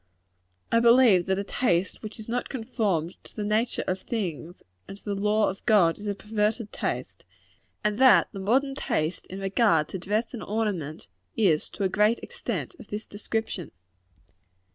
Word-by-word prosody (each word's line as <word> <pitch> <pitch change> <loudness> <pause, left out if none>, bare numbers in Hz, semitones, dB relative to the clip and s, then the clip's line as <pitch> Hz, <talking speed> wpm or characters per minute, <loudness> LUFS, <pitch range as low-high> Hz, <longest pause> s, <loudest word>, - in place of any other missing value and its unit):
I 230 - +5
believe 235 -6 +6
that 190 0 +1
a 200 - -1
taste 190 -4 0
which 215 +1 -8
is 220 - -9
not 245 +1 -2
conformed 205 - -2
to - - -15
the 210 - -3
nature 215 +3 0
of 185 +1 -2
things 175 - -4 0.2
and 195 - -8
to - - -24
the 205 - -1
law 210 +2 +2
of 195 - -12
God, 195 -7 +4
is 210 - -7
a 200 - -1
perverted 210 +1 -1
taste; - - -4 0.6
and 210 +1 0
that 260 -1 +7
the 195 - -7
modern 260 +8 +2
taste 160 - -2
in 190 - -7
regard 195 -5 +2
to 190 - -5
dress 210 +7 -1
and 235 - -5
ornament, 195 - -3 0.3
is, 170 -8 +2
to 200 - -5
a - - +4
great 210 +4 +3
extent, - - -4
of - - -12
this 210 +1 -5
description. 205 -4 -4
210 Hz, 175 wpm, -27 LUFS, 190-225 Hz, 0.6 s, that